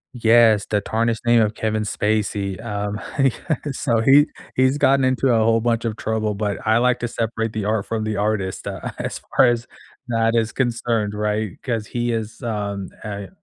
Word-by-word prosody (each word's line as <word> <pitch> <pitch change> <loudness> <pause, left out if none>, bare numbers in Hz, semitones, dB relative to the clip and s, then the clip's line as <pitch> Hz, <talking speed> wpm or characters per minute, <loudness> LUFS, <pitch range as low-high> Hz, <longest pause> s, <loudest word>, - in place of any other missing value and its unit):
Yes, 115 -3 +4
the 105 - +1
tarnished 115 +2 -1
name 120 -1 +5
of 105 0 0
Kevin 110 -1 -1
Spacey, 105 -1 -1
um, 105 -2 -3 0.2
he 135 -2 +4 0.2
got 155 -5 +1
so 120 -3 0
he 140 +6 +6 0.3
he's 130 +2 +3
gotten 135 -1 +3
into 130 +1 +2
a 110 - +3
whole 115 0 +3
bunch 115 0 0
of 110 -1 -2
trouble, 110 -1 -1
but 100 -1 -2
I 110 +1 +4
like 125 +1 +2
to 120 - -2
separate 115 -1 -2
the 110 -2 -3
art 105 -1 -1
from 115 -1 -2
the 110 0 -2
artist, 100 -2 -1
uh, - - -5
as - - -4 0.2
far 130 - +7
as 120 0 0 0.4
that 115 0 +1
is 110 -1 +1
concerned, 115 -4 -1
right? 105 -2 -2
'Cause 115 -5 -2
he 120 0 -2
is, 110 +2 -4
um, 100 -4 -3
I 100 -2 -6
110 Hz, 190 wpm, -21 LUFS, 105-120 Hz, 0.4 s, far